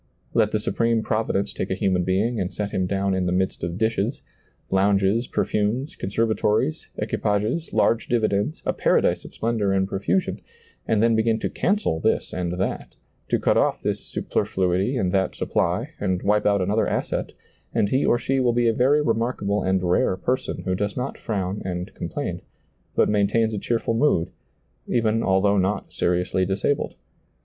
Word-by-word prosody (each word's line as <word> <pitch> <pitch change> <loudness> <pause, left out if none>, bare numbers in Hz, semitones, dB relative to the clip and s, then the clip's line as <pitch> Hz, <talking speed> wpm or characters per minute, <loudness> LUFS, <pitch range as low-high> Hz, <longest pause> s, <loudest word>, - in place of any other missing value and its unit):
Let 105 - +3
the 110 - 0
Supreme 115 +1 0
Provi 110 +1 -1
dence 100 +1 -1
take - - -3
a 95 - 0
human 95 -3 +1
being 105 +6 0
and 90 -1 -2
set 105 -1 -3
him 95 -1 0
down 100 0 0
in 95 -1 0
the - - 0
midst 95 +1 -1
of 85 +1 -3
dishes, 110 +2 -1 0.5
lounges, 100 +4 +2
perfumes, 110 +8 -1
conserva 110 +3 0
tories, 105 -7 0
equipages, 105 +11 -1
large 115 - +2
dividends, 110 +4 0
a - - +1
paradise - - +2
of - - -12
splendor 110 -3 0
and 95 0 +1
profusion, 180 - -1 0.5
and 110 -1 +2
then 115 -1 +4
begin 110 0 +2
to - - -2
cancel 200 - 0
this - - 0
and 90 -1 -2
that, 90 +2 -3 0.3
to - - +3
cut - - +2
off - - +1
this - - -1
superfluity 95 +7 -1
and 95 -6 0
that 95 -1 0
supply, - - -1
and 95 -2 -1
wipe 105 +1 +2
out 100 -2 +3
another 105 +4 +1
asset, - - -2 0.4
and 100 - +1
he 130 +4 +2
or - - +3
she 135 +2 0
will 125 -2 +2
be 120 0 +2
a 115 - +3
very 140 +6 +3
remarkable 115 -4 0
and 95 0 +1
rare 90 +1 +2
person 125 +7 -2
who 95 - -1
does 100 +2 -2
not 125 +2 -3
frown 100 -3 -2
and 90 -1 -4
complain, - - -4 0.5
but - - +4
maintains 110 +2 +2
a 105 - -2
cheer 120 +4 0
ful 115 - -2
mood, 115 - +2 0.6
even 115 -1 +1
although 100 0 +3
not 95 +2 -1
seriously 90 +1 +1
disabled. 100 +9 -1
105 Hz, 175 wpm, -24 LUFS, 95-115 Hz, 0.6 s, then